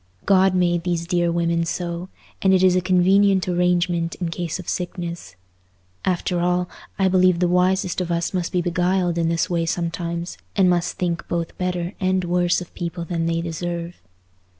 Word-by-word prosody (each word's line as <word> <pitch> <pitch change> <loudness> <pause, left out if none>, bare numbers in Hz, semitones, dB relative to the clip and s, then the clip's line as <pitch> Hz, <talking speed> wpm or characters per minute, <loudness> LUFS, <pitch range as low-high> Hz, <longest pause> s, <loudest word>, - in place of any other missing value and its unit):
God 190 -1 +4
made 175 -1 +2
these 170 -1 -1
dear 175 -1 +1
women 170 0 +1
so—and 175 +2 -3
it 185 - +3
is 185 -1 +5
a 185 - +3
convenient 190 +1 +3
arrangement 175 -1 +1
in 175 -2 -3
case 170 -1 -3
of 185 - -10
sickness. 175 - -4 0.7
After 180 -1 0
all, 180 +1 +1 0.3
I 190 - +3
believe 185 -1 +4
the 180 +1 +2
wisest 180 +1 +1
of 175 -1 -3
us 170 +2 -1
must 180 -2 -1
be 180 -1 0
beguiled 175 0 +1
in 165 -1 +1
this 165 0 +1
way 170 -2 -1
sometimes, 170 0 -3 0.2
and 195 -2 +4
must 175 -1 +1
think 170 -2 -2
both 170 -1 -3
better 180 0 -2
and 185 0 +1
worse 175 0 +1
of 175 - -10
people 170 0 -4
than 165 0 -2
they 165 0 0
deserve. 170 +1 -4
175 Hz, 175 wpm, -22 LUFS, 170-185 Hz, 0.7 s, is